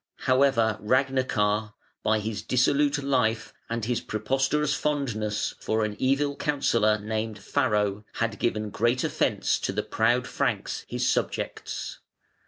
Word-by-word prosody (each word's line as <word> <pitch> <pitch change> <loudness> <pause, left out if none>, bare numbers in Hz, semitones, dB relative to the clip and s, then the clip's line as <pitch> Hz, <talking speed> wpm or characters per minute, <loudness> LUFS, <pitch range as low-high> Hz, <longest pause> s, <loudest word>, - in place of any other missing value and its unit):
However 130 -4 +3
Ragnachar, 110 -4 +1 0.3
by 110 0 +2
his 105 -1 -3
dissolute 145 +3 +2
life 120 -5 +1 0.2
and 115 -1 -2
his 120 0 0
preposterous 135 +7 0
fondness 115 -8 -1
for 110 0 0
an 105 -1 -4
evil 140 +2 +1
counsellor 115 -8 +2
named 110 +1 -3
Farro, 105 0 0
had 115 -2 -2
given 105 -3 -1
great 120 +5 +1
offence - - +1
to - - -2
the - - -2
proud 120 +3 +1
Franks, - - -2
his - - -1
subjects. - - -2
115 Hz, 125 wpm, -26 LUFS, 105-135 Hz, 0.3 s, However